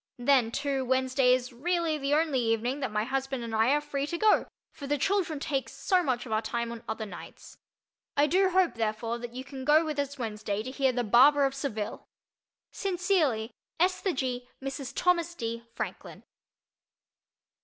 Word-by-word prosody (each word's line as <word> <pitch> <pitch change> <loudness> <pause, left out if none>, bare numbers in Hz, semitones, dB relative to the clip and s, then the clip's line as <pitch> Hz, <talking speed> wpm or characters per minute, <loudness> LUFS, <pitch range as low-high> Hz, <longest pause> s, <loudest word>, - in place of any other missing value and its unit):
Then, 245 -2 +3
too, 275 +1 -1
Wednesday 260 0 +2
is 250 -1 -5
really 335 +5 0
the 285 0 0
only 305 -4 +2
evening 235 +3 0
that 265 - -2
my 210 0 0
husband 265 0 -2
and 230 -1 -5
I 220 +2 +3
are 290 +2 +4
free 285 -1 -3
to 340 - -3
go, 430 +3 +4 0.2
for 280 - -9
the 290 +1 +1
children 350 -2 0
take 275 -2 -2
so 370 -2 +1
much 260 -7 -1
of 235 - -9
our 215 0 +2
time 235 0 -3
on 235 0 -8
other 220 0 -3
nights. 200 - -11 0.6
I 290 - +5
do 375 +6 +3
hope, 370 -1 +3
therefore, 225 +1 -2
that 240 0 -8
you 260 - -5
can 265 -1 -8
go 305 +4 +5
with 305 -2 -3
us 285 0 -2
Wednesday 215 -3 -3
to 255 - -6
hear 270 -1 +2
"The 245 -1 -1
Barber 275 +6 +6
of 270 - 0
Seville." 245 -7 -4 0.7
Sincerely, 350 - 0 0.3
Esther 365 +1 +2
G. 250 -2 -3
(Mrs. 270 0 -5
Thomas 345 -1 +1
D.) 230 -3 -5
Franklin. - - -6
265 Hz, 180 wpm, -29 LUFS, 235-295 Hz, 0.7 s, Barber